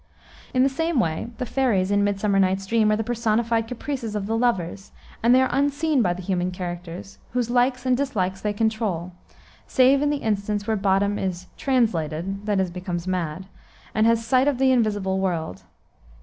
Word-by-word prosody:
In 255 0 +3
the - - +5
same 325 +2 0
way, 160 0 -1
the 250 - -3
fairies 225 -8 +1
in 205 0 +3
Midsummer 200 0 +1
Night's 190 0 +1
Dream 215 +1 +2
are - - +3
the 220 - -1
personified 230 0 0
caprices 250 -2 -4
of 205 -2 -2
the 220 +2 -1
lovers, 200 -5 -1 0.3
and 230 - +2
they 260 - +5
are 260 - 0
unseen 285 +1 +1
by 180 -6 +2
the 180 +1 -5
human 180 -1 -1
characters, 175 - -7
whose 245 -1 0
likes 250 +1 +1
and 255 -1 +3
dislikes 195 -9 -1
they 210 - 0
control, 205 -5 -1 0.6
save 265 +2 +4
in 295 - +2
the 295 - 0
instance 205 -1 -1
where 220 0 0
Bottom 200 0 +1
is 185 -1 -3
"translated" 195 - -1
(that 205 -2 +1
is, 185 -2 0
becomes 180 -1 -4
mad) 180 -1 -3 0.5
and 220 +1 +3
has 230 0 +2
sight 255 +3 +3
of 285 -3 +2
the 265 0 +3
invisible 205 -6 +1
world. 165 - -2
210 Hz, 185 wpm, -24 LUFS, 185-245 Hz, 0.6 s, the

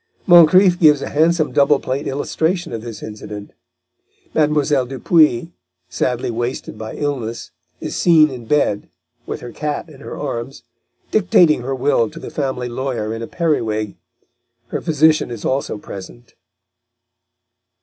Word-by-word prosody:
Moncrif 175 +1 +6
gives 150 -4 +5
a - - -4
handsome 160 +1 +2
double 140 0 +3
plate 135 +3 -3
illustration 160 +4 -1
of 115 - -4
this 115 -1 -8
incident. 105 -1 -8 0.8
Mlle. 150 -3 +2
Dupuy, 150 +3 +2 0.4
sadly 125 +5 -1
wasted 120 0 -4
by 110 0 -7
illness, 125 -6 -4 0.3
is - - -5
seen 155 -4 +5
in 125 -3 -8
bed, 125 -8 +1 0.4
with - - -5
her 120 - -8
cat 150 +5 -4
in 140 -3 -15
her - - -8
arms, 125 -3 -5 0.5
dictating 175 -8 +4
her 135 +2 -3
will 130 -4 +1
to - - -14
the - - -8
family 130 -4 -2
lawyer 120 -3 -3
in 115 - -6
a 115 - -5
periwig; 110 - -1 0.7
her - - -3
physician 155 -2 +3
is 115 -4 -7
also 130 -4 -1
present. 90 -13 -11
135 Hz, 140 wpm, -19 LUFS, 115-155 Hz, 0.8 s, Moncrif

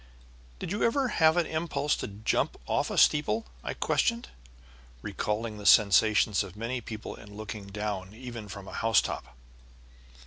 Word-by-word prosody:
"Did - - -6
you 205 - -2
ever 255 +2 +2
have 160 -4 +4
an 175 - +3
impulse 155 -2 -1
to - - -4
jump 105 +2 -1
off - - 0
a - - -4
steeple?" 185 +9 +3 0.2
I - - -4
questioned, 235 0 0 0.7
recalling 105 0 -3
the 105 - -9
sensations 105 0 +5
of 100 0 -11
many 120 +3 -3
people 110 -1 -7
in 105 0 -13
looking 105 -1 -7
down 100 -1 -4
even 120 -3 -8
from 100 0 -9
a - - -9
housetop. 115 - 0
110 Hz, 150 wpm, -29 LUFS, 105-150 Hz, 0.7 s, sensations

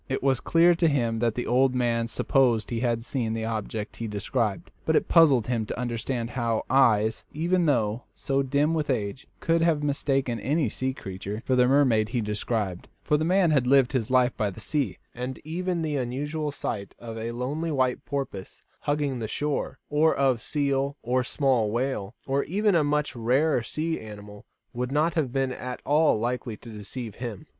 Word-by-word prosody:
It 135 - -2
was 135 -3 +2
clear 170 +5 +4
to 170 0 +2
him 120 -6 +1
that 115 -1 +1
the 125 - -2
old 130 +1 +3
man 115 -2 +1
supposed 120 -2 +1
he 115 - -1
had 115 -1 0
seen 115 -4 -1
the 110 0 -2
object 110 -1 -4
he 115 - -4
described, 105 0 -2
but - - +1
it - - +2
puzzled 140 -9 +5
him 120 -2 0
to - - -5
understand 120 0 -2
how 115 -3 -1
eyes, 115 -5 +3
even 170 +2 +1
though 115 -4 +1
so 135 0 0
dim 140 +4 +1
with 155 -3 -1
age, 115 0 -2
could 165 0 +2
have 165 -3 +2
mistaken 135 -4 0
any 145 -2 +1
sea 130 +5 -2
creature 100 +2 -6
for 130 - +2
the 125 0 +4
mermaid 125 -6 +3
he 120 +1 -1
described; 105 -3 -2 0.2
for 150 - +2
the 150 - +1
man 180 0 +3
had 135 -4 +2
lived 135 -1 +5
his 120 -5 0
life 130 -1 +3
by 105 - 0
the 95 - -9
sea, 120 - -1 0.2
and 125 +2 -5
even 175 +2 -2
the 150 -2 -1
unusual 145 +5 -2
sight 105 -8 -5
of 115 -1 -8
a 115 +1 -4
lonely 140 +8 -3
white 130 -4 0
porpoise 135 -9 -5 0.2
hugging 145 -3 -1
the 110 - -3
shore, 145 +1 -2
or 155 +2 +3
of 130 -4 +2
seal 140 0 0
or 125 +2 +1
small 125 -5 +1
whale, 115 -3 -2
or 140 +1 +1
even 205 +4 +1
a 165 -3 +4
much 150 -1 0
rarer 125 +5 +2
sea 160 +7 -2
animal, 105 0 -10 0.3
would 125 +1 -3
not 155 +4 +2
have 150 -7 0
been 135 0 0
at 125 0 -5
all 150 -4 +3
likely 120 -1 -2
to 115 - -11
deceive 110 +2 -6
him. 120 -5 -6
130 Hz, 190 wpm, -26 LUFS, 115-145 Hz, 0.3 s, puzzled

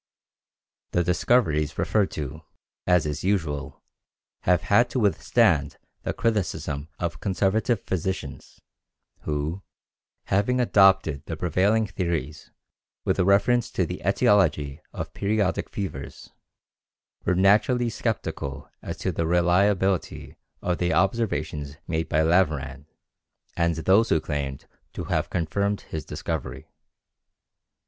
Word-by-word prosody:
The 90 - +2
discoveries 85 - +1
referred 105 -3 +1
to, 75 +1 -5 0.5
as 90 -3 +4
is 75 0 -3
usual, 75 -7 -2 0.6
have 90 -1 +3
had 115 +7 +4
to 130 - -1
withstand 100 -7 +2 0.2
the - - -2
criticism 95 -9 -2
of 80 -4 -3
conservative 100 +3 0
physicians, 95 -5 -4 0.7
who, 75 +5 -2 0.6
having 105 +6 +1
adopted 95 - +3
the - - -4
prevailing 100 +6 +2
theories 85 -6 -3 0.6
with - - +1
reference 100 +6 +3
to - - +1
the - - -6
etiology 75 -8 +2
of - - -6
periodic 100 -1 0
fevers, 80 -9 -6 0.9
were 90 - +1
naturally 110 +6 +3
skeptical 70 - -4
as - - -6
to - - -2
the 85 - -2
reliability 90 +2 +1 0.3
of 90 -1 -1
the 90 -1 +1
observations 80 -7 -1
made 80 -1 -2
by 80 +1 +2
Laveran 75 -5 +1 0.7
and 85 -1 +1
those 95 +8 +3
who 80 - +3
claimed 70 -3 -4 0.3
to - - -5
have - - -1
confirmed 100 +5 -1
his 80 -1 -6
discovery. - - -5
90 Hz, 110 wpm, -25 LUFS, 75-100 Hz, 0.9 s, as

